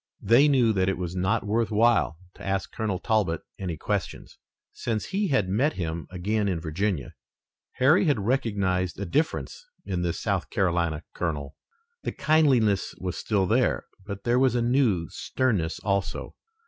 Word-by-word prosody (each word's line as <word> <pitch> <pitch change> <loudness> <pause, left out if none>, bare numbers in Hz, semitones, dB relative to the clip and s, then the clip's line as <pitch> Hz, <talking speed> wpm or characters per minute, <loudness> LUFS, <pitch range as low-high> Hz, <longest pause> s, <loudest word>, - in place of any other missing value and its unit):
They 130 +6 +6
knew 125 -6 +4
that 95 -1 +1
it 95 - -1
was 90 -1 -4
not 95 +2 0
worth 110 +2 +1
while 110 -6 +3 0.2
to - - -13
ask 95 0 -2
Colonel 105 -4 -2
Talbot 100 -5 0 0.2
any 90 -4 -3
questions. 100 -3 -4 0.3
Since 110 -2 -2
he 200 +1 -1
had 130 - +2
met 130 +11 +1
him 80 -3 -4
again 100 +4 -1
in 90 -4 0
Virginia, 80 - -2 0.6
Harry 145 +9 +4
had 145 -8 +2
recognized 100 -8 0
a 100 - -2
difference 155 - -1 0.2
in 90 -2 -2
this 85 -1 -1
South - - -1
Carolina 85 -4 0
colonel. 75 -4 -3 0.5
The - - -3
kindliness 130 - +2
was 90 -1 -4
still 100 -4 0
there, 120 +6 +1 0.2
but 100 0 -7
there 120 +1 +2
was 130 -2 +3
a 120 - +2
new 120 -9 +2
sternness 100 -11 -1
also. 100 -1 -2
100 Hz, 160 wpm, -26 LUFS, 90-120 Hz, 0.6 s, They